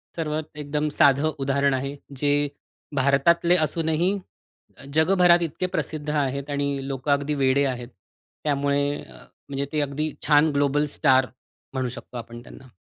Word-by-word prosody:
सर्वात 155 -1 -3
एकदम 150 +1 -2
साधं 145 +3 +4
उदाहरण 140 0 +2
आहे. 135 +2 -2 0.2
जे 145 +2 0 0.6
भारतातले 140 +6 +3
असूनही 160 +3 +1 0.7
अ, - - -13
जगभरात 175 +1 +5
इतके 185 - -3
प्रसिद्ध 150 -1 -3
आहेत 140 -1 -1
आणि 140 0 -1 0.2
लोकं 135 +1 -2
अगदी 140 +1 +1
वेडे 140 +2 +3
आहेत. 120 -1 -8 0.6
त्यामुळे 140 -1 +1 0.2
म्हणजे 140 0 -7
ते 155 - +1
अगदी 145 +2 -2 0.2
छान 150 +1 +5
ग्लोबल 145 +1 +2
स्टार 130 0 +4 0.5
म्हणू 130 -2 -1
शकतो 125 0 -9
आपण 120 0 -8
त्यांना. 130 - -14
145 Hz, 135 wpm, -24 LUFS, 135-155 Hz, 0.7 s, जगभरात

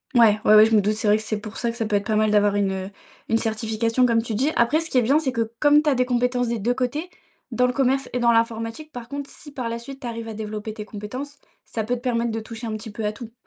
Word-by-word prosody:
Mouais, 220 -3 +6
ouais, 215 - +6
ouais, 215 0 +9
je 225 - +2
me 210 - +5
doute, 210 +2 +1
c'est 215 0 -2
vrai 210 +1 +5
que 220 - -5
c'est 215 0 -2
pour 210 0 -9
ça 235 -1 -1
que 235 - -10
ça 225 -3 -1
peut 210 - 0
être 200 0 0
pas 215 - 0
mal 215 0 +3
d'avoir 205 -1 +3
une, 200 -1 +1
heu, 190 0 -4 0.4
une 225 - +3
certification 225 +2 0
comme 230 -1 +3
tu 225 -2 -4
dis. 275 +7 +1
Après, 260 +7 +3
ce 325 -1 -5
qui 255 - +4
est - - +3
bien, 270 +6 +3
c'est 285 -5 0
que 230 -2 -2
comme 295 0 +5
tu 305 - +1
as 275 - +2
des 250 0 +2
compétences 245 -1 0
des 235 -2 -1
2 240 +5 0
côtés, 290 +7 -2 0.4
dans 250 +2 +2
le 250 - 0
commerce 270 0 +1
et 245 - 0
dans 235 0 +4
l'informatique, 230 +6 -1
par 240 -1 -8
contre, 280 0 -5
si 290 - -11
par 250 -5 -4
la 230 0 -4
suite 270 +3 -10
tu 245 - -5
arrives 230 -1 -5
à 220 - -6
développer 215 0 -5
tes 210 -1 -7
compétences, 255 +8 -7 0.3
ça 220 - -3
peut 245 +3 -1
te - - -6
permettre 235 -2 0
de 225 - -2
toucher 225 +1 -7
un 215 - -3
petit 220 0 -9
peu 220 +2 -6
à 210 - +1
tout. 225 +1 -10
230 Hz, 310 wpm, -23 LUFS, 215-250 Hz, 0.4 s, ouais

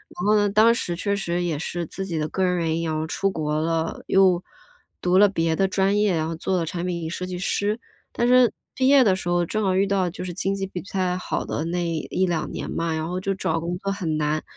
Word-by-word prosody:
然 180 - -4
后 210 +1 +4
呢， 205 -1 +3
当 220 +3 +5
时 175 -8 -2
确 200 +3 -1
实 175 -2 -1
也 160 -4 -1
是 175 0 -3
自 195 +4 -6
己 170 -4 -3
的 155 0 -1
个 190 - -1
人 180 -1 +2
原 165 -1 0
因 165 - -2
然 155 - -1
后 160 - -2
出 195 +4 0
国 155 -3 -1
了， 165 0 -1
又 185 -2 +4 0.6
读 180 +1 +3
了 205 +1 +7
别 165 -4 0
的 195 +2 +2
专 195 +1 +1
业， 205 -4 +2
然 160 0 0
后 165 - -3
做 185 +3 -1
了 165 - 0
产 170 +2 -4
品 170 -3 -3
设 180 +1 -4
计 180 -1 -5
师。 205 +4 -1 0.4
但 240 - +1
是 250 -2 +5 0.2
毕 260 0 +2
业 275 -2 +7
的 190 -4 +3
时 180 - -6
候 175 0 +2
正 215 +4 -2
好 190 -1 +1
遇 195 +1 +3
到 195 -2 +1
就 180 - -7
是 180 - -5
经 195 +1 -1
济 195 -1 -3
不 185 - -6
太 185 -2 0
好 - - -3
的 155 - -3
那 175 +1 -1
1-2 165 +1 -1
年 - - -5
嘛， 165 -1 -1
然 160 0 -2
后 180 - -2
就 195 +1 -1
找 165 - -1
工 170 +2 -3
作 195 -1 -2
很 170 -6 -2
难， 155 +1 0
180 Hz, 275 characters per minute, -24 LUFS, 165-195 Hz, 0.6 s, 了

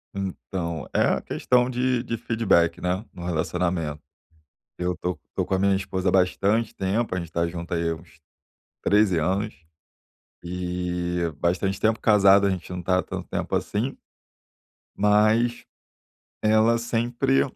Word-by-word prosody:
Então, 90 -4 -4
é - - +4
a - - +2
questão 125 0 +1
de 125 -1 0
de 115 -1 -3
feedback, 100 -8 +2
né? 90 +5 -1
No 85 - -8
relacionamento. 85 -2 -1 0.8
Eu 90 0 -1
tô 90 0 -3 0.2
tô - - 0
com - - -3
a - - 0
minha 100 0 +3
esposa 95 -1 -1
há - - +1
bastante 100 +4 +2
tempo, 100 +2 -1
a - - -1
gente 85 -1 -7
tá 85 0 0
junto 85 0 -6
aí 85 -1 0
há 80 - -1
uns 80 0 -17 0.6
13 105 -3 +3
anos. 95 +7 0 0.9
E, 90 -1 -2
bastante 95 +3 0
tempo 110 0 +2
casado 100 -2 +5
a - - +3
gente 95 -2 -5
não 90 0 -4
tá 90 +1 +2
há - - -1
tanto - - -6
tempo - - -2
assim. 115 +7 -2 1.0
Mas 110 +3 +3 0.8
ela 110 +2 +4
sempre 120 +3 +1
95 Hz, 150 wpm, -25 LUFS, 90-110 Hz, 1.0 s, casado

